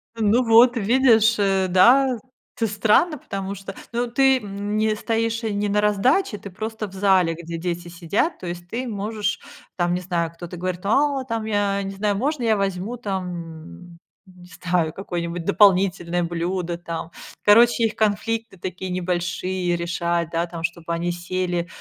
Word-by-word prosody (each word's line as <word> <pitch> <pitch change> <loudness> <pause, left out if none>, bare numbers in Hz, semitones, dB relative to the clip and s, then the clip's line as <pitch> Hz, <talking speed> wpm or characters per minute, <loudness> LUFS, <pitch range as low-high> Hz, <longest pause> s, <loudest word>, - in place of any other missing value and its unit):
Ну 225 +3 +2
вот, 235 +2 +6
видишь, 230 0 +4
э, 195 -1 +2
да, 250 +7 +5 0.4
т 230 -2 0
странно, 215 - +2
потому 195 -3 -5
что, 195 0 -8 0.2
ну, 240 +1 0
ты, 265 +2 +3
м, 205 0 -5
не 215 0 +1
стоишь 230 +1 -1
не 205 -1 -1
на 210 +1 +2
раздаче, 210 - +2
ты 200 - -9
просто 220 +2 -5
в 190 - -15
зале, 190 -4 +3
где 170 0 -6
дети 175 0 -4
сидят, 175 - -1
то 180 - -7
есть 175 0 -6
ты 245 +6 -4
можешь 210 -1 -2 0.4
там, 175 0 +1
не 180 - -1
знаю, 170 -2 -2
кто-то 175 +1 -9
говорит, 180 0 -3
а, 275 +4 +2
там, 230 -3 -3
я 205 -2 0
не 195 - -4
знаю, 200 0 -1
можно 275 +2 -1
я 220 -2 +3
возьму 195 +4 -2
там, 175 - -6 0.3
не 180 -1 -17
знаю, 175 -3 0
какое-нибудь 175 -2 -4
дополнительное 185 -3 +3
блюдо 175 +1 -2
там? 165 -1 -6 0.3
Короче, 230 +2 +5
их 215 -1 -2
конфликты 220 0 -1
такие 185 +1 -5
небольшие 180 0 -1
решать, 170 -1 -1
да, 170 +1 0
там, 170 -1 -8
чтобы 170 0 -3
они 175 +1 -1
сели, 175 0 -2
195 Hz, 160 wpm, -22 LUFS, 175-220 Hz, 0.4 s, вот